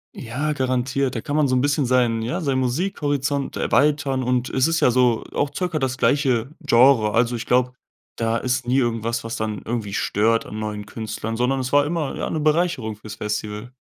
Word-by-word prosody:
Ja, 140 +6 -3
garantiert. 130 0 0
Da 115 - -3
kann 145 - -3
man 150 -2 +3
so 130 - +1
'n 125 - +2
bisschen 145 0 +1
seinen 120 -3 +2
ja, 170 +10 -2
seinen 135 -3 0
Musikhorizont 145 -1 -1
erweitern 145 -3 +1
und 125 0 0
es 130 0 +2
ist 165 0 +1
ja - - +4
so 125 -2 +2
auch 145 0 0
circa 180 -4 -1
das 130 -2 -1
gleiche 130 -4 +2
Genre. 120 -5 +4
Also, 120 +1 +2
ich 115 - -5
glaube, 125 0 +2 0.4
da 115 0 0
ist 125 0 -1
nie 130 +2 +2
irgendwas, 115 -1 -1
was 115 - -4
dann 110 -2 -3
irgendwie 110 -4 -3
stört 115 +3 +1
an 105 - -7
neuen 105 -1 -5
Künstlern, 110 0 -5
sondern 130 +2 +1
es 130 0 -3
war 145 0 +5
immer, 155 -3 -2
ja, - - -2
'ne 155 - -2
Bereicherung 150 -8 +1
fürs 105 0 -10
Festival. 105 +2 -4
125 Hz, 200 wpm, -22 LUFS, 115-140 Hz, 0.4 s, war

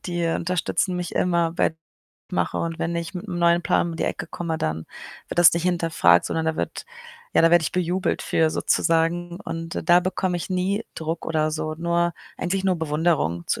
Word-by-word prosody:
die, 175 -1 -2
äh, 165 -1 +1
unterstützen 180 +1 -1
mich 180 0 -4
immer 170 -2 +1
bei 165 - +1 0.6
mache. - - 0
Und 165 -1 -3
wenn 170 +1 -2
ich 170 +1 -4
mit 185 +4 -6
'nem 175 - -3
neuen 170 0 +4
Plan 170 - +1
um 165 - -6
die - - -1
Ecke - - -3
komme, 165 -2 -3
dann 80 - -3 0.4
wird - - -5
das 175 -2 +8
nicht 170 +1 -1
hinterfragt, 165 - +3
sondern 160 0 -2
da 160 0 0
wird - - -4 0.5
ja, - - +5
da 165 - +6
werde 175 -1 +6
ich - - -1
bejubelt 180 0 0
für 160 -1 +2
sozusagen. 170 +2 +1
Und 165 0 -5
da 175 +1 +7
bekomme 180 0 -1
ich 175 - -5
nie 190 +4 0
Druck 165 +1 -3
oder 155 -1 +1
so, 155 0 -3
nur 170 0 +1 0.3
eigentlich 190 +2 -1
nur 190 -1 +3
Bewunderung 150 - 0
zu - - -1
170 Hz, 205 wpm, -24 LUFS, 160-175 Hz, 0.6 s, das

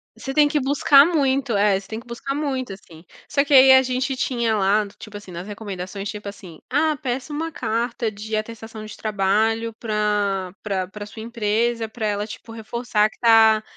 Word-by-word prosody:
Você 270 - -6
tem 295 +1 +4
que 300 0 0
buscar 280 +1 +5
muito. 275 -7 +1
É, 200 -1 +3
você 195 - -15
tem 220 0 -5
que 240 - -15
buscar 250 +3 -5
muito, 265 -6 -2
assim. 170 -4 -12 0.2
Só 280 - +2
que 290 - -10
aí 265 0 +9
a 260 0 +8
gente 260 +1 -1
tinha 235 -3 0
lá, 205 +1 +2
tipo 215 -2 -9
assim, 205 -3 -12
nas 175 +3 -7
recomendações, 200 -2 -6
tipo 210 -1 -6
assim: 180 -5 -12
"Ah, 305 +3 +2
peça 260 +2 -3
uma 325 +2 -3
carta 230 -3 -2
de 215 +1 -5
atestação 220 0 -6
de 215 - -9
trabalho 220 +2 0
pra 210 -4 -1
pra 190 -3 -2
pra 205 +2 -8
sua 220 - -10
empresa, 230 0 -1
pra 220 0 -5
ela, 205 0 -1
tipo, 225 - -10
reforçar 225 -1 0
que - - -22
tá 225 -2 +5
220 Hz, 190 wpm, -22 LUFS, 205-255 Hz, 0.2 s, aí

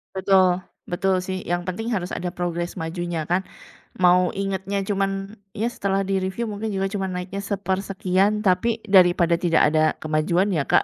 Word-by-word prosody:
Betul, 185 -1 +3 0.2
betul 190 +2 0
sih, 185 0 -3
yang 175 0 -2
penting 195 +6 -3
harus 185 -6 -2
ada 180 - -2
progres 175 -1 -3
majunya, 165 0 -3
kan. 180 +4 +1 0.5
Mau 180 0 +3
ingetnya 195 0 -2
cuman, 195 +1 -2 0.2
ya 225 +3 -1
setelah 195 -4 -1
di-review 195 +3 -2
mungkin 210 +1 -4
juga 195 0 -1
cuman 195 -2 -3
naiknya 180 +2 -4
sepersekian, 195 +1 0
tapi 215 +4 +1
daripada 175 -3 +5
tidak 170 -1 +2
ada 155 0 +2
kemajuan 160 +5 +1
ya, 155 -8 0
Kak. - - +4
190 Hz, 155 wpm, -23 LUFS, 175-195 Hz, 0.5 s, daripada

